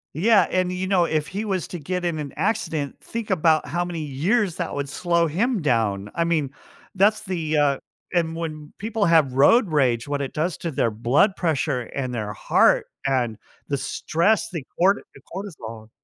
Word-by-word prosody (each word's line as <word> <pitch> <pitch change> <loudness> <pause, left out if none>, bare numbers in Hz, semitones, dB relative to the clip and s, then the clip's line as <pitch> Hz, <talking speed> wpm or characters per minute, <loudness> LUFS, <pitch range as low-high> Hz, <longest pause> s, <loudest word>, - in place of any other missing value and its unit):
Yeah, 210 +5 +4
and, 185 0 +1
you 185 +1 -3
know, 185 -3 +3
if 155 -2 -1
he 205 +3 -4
was 190 -3 -2
to 175 - -6
get 180 +4 -3
in 170 -2 -1
an 145 -2 -5
accident, 155 - -1
think 230 -2 -5
about 160 -3 +3
how 175 +1 -1
many 175 -2 -5
years 170 - 0
that - - -3
would 140 -1 -3
slow 170 0 +1
him 210 - 0
down. 105 -8 0
I 170 - +2
mean, 155 -5 0 0.4
that's 210 +3 +3
the, 165 -5 -1
uh 140 -2 +3 0.3
and 165 -2 0
when 155 -2 -6
people 220 0 -1
have 160 -7 +4
road 180 - +5
rage, 130 -6 +1
what 145 0 -2
it 135 - -3
does 160 +3 -1
to 170 - -3
their 120 - +1
blood 120 - +2
pressure 150 -6 0
and 130 -3 -3
their 105 -2 -3
heart 105 - +3 0.2
and 125 -5 0 0.3
the 140 - 0
stress, 215 +11 0
the 165 -7 -5 0.2
cor 195 +3 +5 0.2
the - - -15
cortisol 115 - -7
160 Hz, 185 wpm, -23 LUFS, 140-185 Hz, 0.4 s, road